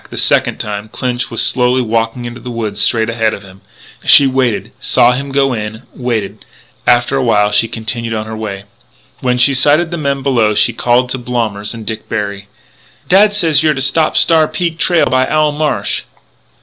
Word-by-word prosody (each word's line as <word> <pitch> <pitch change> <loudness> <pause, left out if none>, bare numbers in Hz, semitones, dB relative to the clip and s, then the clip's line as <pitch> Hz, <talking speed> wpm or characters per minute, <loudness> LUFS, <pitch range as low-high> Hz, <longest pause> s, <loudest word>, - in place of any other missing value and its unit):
The - - -9
second - - +2
time, 105 0 -5
Clinch 125 +1 -3
was 115 - -1
slowly 125 0 +1
walking 115 +1 -2
into 120 +1 -7
the 125 - -8
woods 115 -3 -4
straight 110 -2 +2
ahead 115 -1 -1
of 100 - -12
him. 95 0 -16 0.4
She 140 - +7
waited; 130 -4 -1
saw 120 - +3
him 135 +2 -4
go 135 -1 +1
in; 110 +1 -6
waited. 110 -5 -4 0.4
After 120 +3 +3
a 135 - 0
while 105 -3 +2
she 105 +2 +2
continued 115 +1 -4
on 110 0 -3
her 110 0 -7
way. 100 -3 -6 0.6
When 125 -1 0
she 125 +3 +4
sighted 150 +6 +3
the 170 - -4
men 140 -2 -2
below 115 -6 +1
she 105 +3 +2
called 125 +2 +1
to 130 - -3
Blommers 115 -4 -3
and 115 -1 -9
Dick 110 0 -6
Berry: 100 -1 -4 0.6
"Dad 205 +3 +4
says 165 -7 +2
you're 155 -1 +2
to 135 - -3
stop 155 +3 +1
Star 160 -2 +4
Peak 170 -1 -3
trail 175 -3 +3
by 130 0 +1
Owl 155 -1 +1
Marsh." 150 0 -1
120 Hz, 190 wpm, -14 LUFS, 110-140 Hz, 0.6 s, She